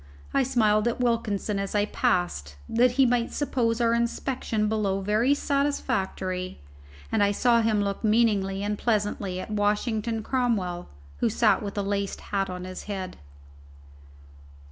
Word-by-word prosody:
I 275 Hz, -, +3 dB
smiled 225 Hz, -4 st, +2 dB
at 235 Hz, -, -1 dB
Wilkinson 220 Hz, -4 st, 0 dB
as 195 Hz, +1 st, -3 dB
I 205 Hz, 0 st, +3 dB
passed, 175 Hz, -, -1 dB
that 240 Hz, +2 st, +3 dB
he 270 Hz, +1 st, +4 dB
might 240 Hz, -1 st, +1 dB
suppose 240 Hz, -5 st, 0 dB
our 230 Hz, -1 st, +3 dB
inspection 235 Hz, -2 st, -1 dB
below 205 Hz, -3 st, 0 dB
very 215 Hz, +8 st, +2 dB
satisfactory, 190 Hz, -11 st, -1 dB, 0.5 s
and -, -, +2 dB
I 200 Hz, -, +4 dB
saw 235 Hz, +3 st, +3 dB
him 215 Hz, -2 st, +2 dB
look 200 Hz, +2 st, -3 dB
meaningly 210 Hz, -3 st, +2 dB
and 210 Hz, 0 st, -2 dB
pleasantly 205 Hz, -4 st, -1 dB
at 215 Hz, -, -6 dB
Washington 215 Hz, +2 st, 0 dB
Cromwell, 210 Hz, -10 st, -1 dB, 0.3 s
who -, -, +1 dB
sat -, -, +3 dB
with 200 Hz, 0 st, -5 dB
a 205 Hz, -, 0 dB
laced 200 Hz, 0 st, -2 dB
hat 195 Hz, -1 st, +1 dB
on 180 Hz, 0 st, -5 dB
his 185 Hz, 0 st, -7 dB
head. 190 Hz, -3 st, -5 dB
210 Hz, 145 wpm, -26 LUFS, 195-235 Hz, 0.5 s, he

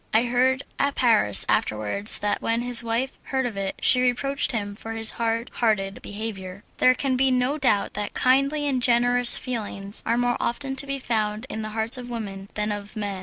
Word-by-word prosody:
I 225 Hz, -, +5 dB
heard 255 Hz, +2 st, +1 dB, 0.2 s
at 280 Hz, 0 st, +1 dB
Paris 220 Hz, -, +3 dB
afterwards 110 Hz, -, +2 dB
that 205 Hz, -, -1 dB
when 230 Hz, +1 st, -1 dB
his 245 Hz, -1 st, +3 dB
wife 235 Hz, +4 st, -2 dB
heard 265 Hz, -1 st, -1 dB
of 235 Hz, -4 st, -4 dB
it 195 Hz, -1 st, -3 dB
she 250 Hz, -, +5 dB
reproached 270 Hz, +3 st, 0 dB
him 205 Hz, -4 st, -4 dB
for 225 Hz, +2 st, -7 dB
his 225 Hz, -1 st, +2 dB
hard 230 Hz, 0 st, -2 dB
hearted 205 Hz, -4 st, -1 dB
behaviour. 205 Hz, -2 st, -7 dB, 0.2 s
There 255 Hz, 0 st, +5 dB
can 265 Hz, -1 st, -1 dB
be 265 Hz, +1 st, +3 dB
no 255 Hz, +4 st, 0 dB
doubt 230 Hz, -7 st, +1 dB
that 210 Hz, 0 st, -5 dB
kindly 275 Hz, +3 st, +2 dB
and 260 Hz, -3 st, 0 dB
generous 245 Hz, 0 st, +4 dB
feelings 205 Hz, -5 st, -5 dB
are 230 Hz, +1 st, 0 dB
more 245 Hz, 0 st, +1 dB
often 270 Hz, +3 st, -2 dB
to 280 Hz, -, +2 dB
be 275 Hz, 0 st, -2 dB
found 220 Hz, -3 st, -2 dB
in 220 Hz, -, -4 dB
the 215 Hz, -, -5 dB
hearts 225 Hz, +3 st, 0 dB
of 245 Hz, 0 st, -8 dB
women 200 Hz, -4 st, -6 dB
than 210 Hz, 0 st, -1 dB
of 205 Hz, +1 st, -6 dB
men. 205 Hz, -3 st, -4 dB
230 Hz, 200 wpm, -24 LUFS, 210-255 Hz, 0.2 s, I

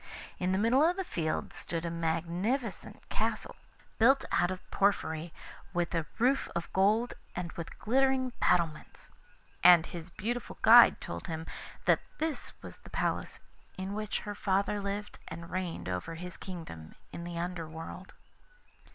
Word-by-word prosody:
In 185 Hz, 0 st, +1 dB
the 190 Hz, -, +2 dB
middle 230 Hz, +6 st, +4 dB
of 345 Hz, +3 st, +4 dB
the 385 Hz, -, -2 dB
field 160 Hz, -, -2 dB
stood 170 Hz, 0 st, -4 dB
a 170 Hz, -, -2 dB
magnificent 170 Hz, +9 st, -2 dB
castle, -, -, -1 dB, 0.4 s
built 265 Hz, +5 st, +5 dB
out 175 Hz, 0 st, +3 dB
of 185 Hz, 0 st, -6 dB
porphyry, 165 Hz, -5 st, +1 dB, 0.4 s
with 175 Hz, -1 st, 0 dB
a 165 Hz, -2 st, 0 dB
roof 260 Hz, +4 st, +2 dB
of 170 Hz, 0 st, -3 dB
gold 215 Hz, +5 st, +3 dB, 0.2 s
and 175 Hz, -1 st, -3 dB
with 170 Hz, -1 st, -7 dB
glittering 260 Hz, +2 st, +2 dB
battlements. 165 Hz, -4 st, 0 dB, 0.5 s
And 175 Hz, -2 st, +9 dB
his 170 Hz, 0 st, -7 dB
beautiful 235 Hz, +7 st, -4 dB
guide 235 Hz, +2 st, +9 dB
told 85 Hz, 0 st, -6 dB
him 160 Hz, 0 st, -4 dB, 0.4 s
that -, -, +5 dB, 0.2 s
this 315 Hz, -2 st, -3 dB
was -, -, -9 dB
the -, -, -15 dB
palace -, -, -2 dB, 0.4 s
in 190 Hz, +1 st, -4 dB
which 215 Hz, 0 st, -2 dB
her 205 Hz, -, -5 dB
father 200 Hz, +1 st, 0 dB
lived 200 Hz, +1 st, -4 dB
and 170 Hz, +1 st, -8 dB
reigned 185 Hz, -, -3 dB
over 90 Hz, -, -3 dB
his 180 Hz, +1 st, -7 dB
kingdom 160 Hz, -, -8 dB, 0.2 s
in 170 Hz, -, -5 dB
the 170 Hz, 0 st, -5 dB
Under 170 Hz, -2 st, -3 dB
world. 165 Hz, +3 st, -8 dB
180 Hz, 150 wpm, -31 LUFS, 165-215 Hz, 0.5 s, And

